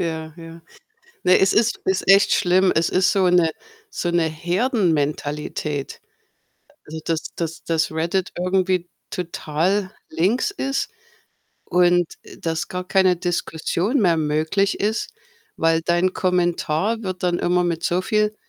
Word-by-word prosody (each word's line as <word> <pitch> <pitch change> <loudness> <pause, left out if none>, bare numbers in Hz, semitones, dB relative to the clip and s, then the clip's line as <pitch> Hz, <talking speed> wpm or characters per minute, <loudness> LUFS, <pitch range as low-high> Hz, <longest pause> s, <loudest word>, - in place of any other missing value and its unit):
Ja, 160 -2 -4
ja. 165 0 -11 0.6
Ne, 185 - +5
es 190 - +3
ist 230 +1 +2
ist 190 0 -1
echt 195 +1 +6
schlimm. 185 +1 +3
Es 160 +1 +2
ist 185 0 +2
so 190 -3 +3
'ne 175 -2 +4 0.4
so 175 - -2
'ne 170 -1 +2
Herdenmentalität. 155 - -1 0.9
Also, 160 +1 -7
dass 165 -1 -3
dass 165 -1 -4
dass 160 -2 0
Reddit 170 +4 -1
irgendwie 185 -1 0 0.2
total 180 +3 -1 0.2
links 200 - +1
ist 275 -9 -2 0.8
und, 175 0 +3 0.2
äh, - - -14
dass 160 -1 -3
gar 180 0 -5
keine 190 -2 +3
Diskussion 175 - -1
mehr 175 -5 +3
möglich 160 +6 0
ist, 215 +2 -1 0.5
weil 165 0 +2
dein 175 +2 +1
Kommentar 180 +3 0
wird 185 -3 -5
dann 175 -1 +1
immer 180 0 +2
mit 170 -1 -2
so 175 +1 +1
viel 215 +2 0
175 Hz, 135 wpm, -22 LUFS, 165-190 Hz, 0.9 s, echt